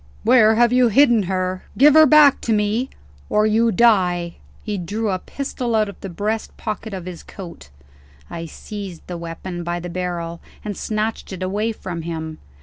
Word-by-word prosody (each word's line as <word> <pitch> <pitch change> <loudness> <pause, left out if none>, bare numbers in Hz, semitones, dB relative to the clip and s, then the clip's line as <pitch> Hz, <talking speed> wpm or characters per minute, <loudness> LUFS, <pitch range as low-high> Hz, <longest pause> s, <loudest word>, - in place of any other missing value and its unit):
"Where 225 -2 +5
have 240 +1 +4
you 250 -1 +5
hidden 240 0 +5
her? 185 0 -2
Give 290 +3 +7
her 315 0 +8
back 295 -1 +6
to 230 - 0
me 215 +5 0 0.4
or 210 0 +3
you 225 +2 +3
die." 180 -6 +2 0.3
He 210 -2 -3
drew 205 +5 -2
a 185 - -1
pistol 250 0 -4
out 215 -1 +2
of 200 - -11
the 195 - -6
breast 210 +5 -3
pocket 215 +1 -5
of 185 -3 -6
his 180 -2 -7
coat. 170 - -11 0.6
I 165 -1 -6
seized 195 0 -8
the 180 - -6
weapon 170 +1 -6
by 175 +1 -2
the 175 0 -7
barrel, 170 -2 -4 0.2
and 205 -1 -3
snatched 215 +2 -3
it 185 -1 -5
away 205 +4 -1
from 180 -6 -6
him. 160 -1 -5
205 Hz, 180 wpm, -21 LUFS, 175-225 Hz, 0.6 s, her